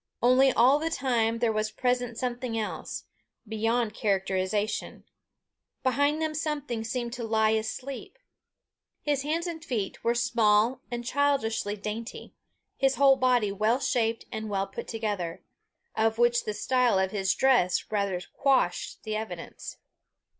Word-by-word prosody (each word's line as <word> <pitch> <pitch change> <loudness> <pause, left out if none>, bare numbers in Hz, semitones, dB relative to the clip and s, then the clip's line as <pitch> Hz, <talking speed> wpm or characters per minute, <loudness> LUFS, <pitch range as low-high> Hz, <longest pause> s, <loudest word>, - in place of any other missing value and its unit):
Only, 255 +2 +5
all 255 +5 +5
the 320 +1 -1
time 235 -7 +1
there 230 -1 +1
was 215 0 -1
present 245 0 -1
something 245 -2 -3
else, 215 -1 -4 0.4
beyond 225 +1 0
characterization: 195 +1 -1 0.8
behind 285 +4 +2
them 315 -1 -1
something 290 -7 -2
seemed 235 +1 -3
to 245 -1 -5
lie 220 -1 +2
asleep. 250 - -4 0.9
His 290 -2 +1
hands 320 +4 -1
and 330 -3 -5
feet 215 -9 -3
were 235 +1 +2
small 235 0 +3
and 240 0 -4
childishly 250 -7 0
dainty, 215 +3 -6 0.4
his 270 0 +2
whole 275 -1 +6
body 250 -5 +2
well 215 +5 +1
shaped 230 -4 0
and 220 0 -4
well 195 -1 0
put 195 - -8
together 205 -7 -3 0.5
of 220 0 +1
which 240 0 +3
the 210 - -3
style 250 -1 +2
of 190 0 +1
his 195 -2 0
dress 245 -11 +2
rather 200 -3 0
quashed 275 -2 +1
the 215 -1 -3
evidence. 200 -6 -6
230 Hz, 140 wpm, -28 LUFS, 215-260 Hz, 0.9 s, whole